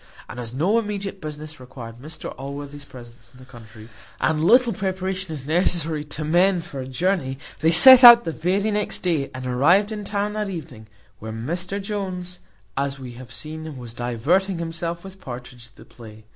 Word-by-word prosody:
And 125 - -9
as 115 -2 -5
no 175 - +1
immediate 200 -3 -5
business 155 -1 -8
required 125 -3 -10
Mr 150 +5 -8
Allworthy's 140 +1 -8
presence 120 -1 -14
in 125 - -19
the 130 - -14
country, 115 -3 -14 0.3
and 155 0 0
little 240 +5 +5
preparation 190 -2 -3
is 145 -4 -6
necessary 165 -1 0
to 150 +1 -6
men 175 +4 +3
for 140 -4 -9
a 130 - -6
journey, 135 -1 -1 0.2
they 160 - +2
set 255 +10 +10
out 235 -1 +11
the 165 - -3
very 190 +7 -1
next 210 0 -1
day, 160 -7 0
and 130 0 -8
arrived 170 - +3
in 210 -1 -5
town 205 +1 -2
that 210 -1 -3
evening, 150 - -8 0.3
when 110 +1 -7
Mr 180 +6 -2
Jones, 185 -3 -5 0.4
as 140 0 -2
we 130 -2 -9
have 120 -1 -12
seen, 155 +5 -7
was 120 -3 -9
diverting 140 - 0
himself 170 +1 -5
with 190 0 -12
Partridge 125 -1 -9
at 115 - -26
the - - -15
play. 110 -2 -14
155 Hz, 185 wpm, -22 LUFS, 130-190 Hz, 0.4 s, out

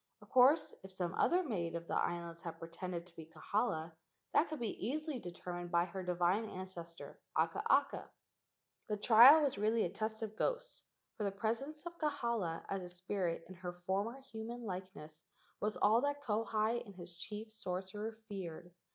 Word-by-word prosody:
Of - - -17
course, 270 +5 +6
if 190 - -11
some 185 -2 -2
other 360 +1 +3
maid 175 - -2
of 170 0 -4
the - - -3
islands 170 -1 -1
had 165 -1 -6
pretended 170 +1 -5
to 175 -2 -20
be 160 -1 -9
Kahala, 165 0 -1 0.4
that 315 - +4
could 310 - -4
be 230 -5 -3
easily 300 0 -2
determined 175 -2 -6
by 170 0 +3
her 185 +2 -5
divine 180 +4 +1
ancestor 175 -3 -8 0.2
Akaaka. - - +2 0.8
The 210 - -1
trial 245 +9 +9
was 270 -8 0
really 220 +2 +3
a 175 - -2
test 220 +1 -3
of 215 -1 -5
ghosts, - - -1 0.4
for 215 - -2
the 200 - +1
presence 235 - -2
of 345 0 -7
Kahala 235 - -1
as 195 -1 -2
a 180 - -7
spirit 180 -2 -2
in 185 - -9
her 180 0 -6
former 205 +7 0
human 235 -1 -7
likeness 180 -5 -7 0.4
was 210 0 -1
all 220 +3 +5
that 285 +1 -1
Kauhi 225 0 +1
and 200 -4 -12
his 175 -1 -9
chief 210 +5 -6
sorcerer 205 +2 -4
feared. 175 -4 -6
200 Hz, 170 wpm, -36 LUFS, 175-235 Hz, 0.8 s, trial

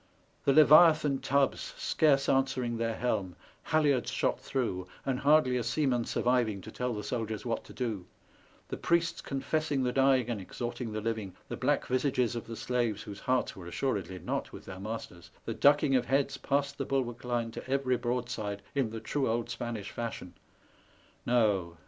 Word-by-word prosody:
The 140 - +4
leviathan 155 -1 +7
tubs 140 0 0
scarce 140 -3 +2
answering 130 -3 +1
their 115 0 -1
helm, 95 -8 -1 0.3
halliards 145 -6 +2
shot - - 0
through, 95 -9 -2 0.2
and 130 -2 0
hardly 145 -4 +4
a 120 - -1
seaman 125 -1 +1
surviving 120 -5 +1
to 110 - -10
tell 125 0 -2
the 105 - -4
soldiers 110 0 -3
what 115 -2 -2
to - - -12
do; 110 -8 -3 0.6
the - - -4
priests 170 0 +1
confessing 140 0 -1
the 125 - +1
dying 135 -2 +3
and 115 -5 -3
exhorting 120 +4 -5
the 110 0 -3
living, 110 -4 -3
the - - -3
black - - +1
visages 125 -2 +1
of 115 - -5
the 115 - -6
slaves 120 -4 -1
whose 100 -2 -8
hearts 130 -2 0
were 90 -4 -9
assuredly 100 -2 -2
not 90 - -3
with - - -10
their 95 -1 -8
masters, 95 -5 -7 0.2
the 115 - -2
ducking 145 +2 +4
of 125 -1 +1
heads 135 +1 +1
past 140 +1 -1
the 135 - -1
bulwark 125 -3 -2
line 120 -2 -1
to 125 - -8
every 135 -2 +1
broadside 120 -5 -3
in 135 -5 +1
the 115 +1 -6
true 135 +5 -1
old 115 0 -1
Spanish 115 -4 -5
fashion 115 -6 -5 0.5
— - - -32
no! 100 -8 +2
125 Hz, 175 wpm, -30 LUFS, 110-135 Hz, 0.6 s, leviathan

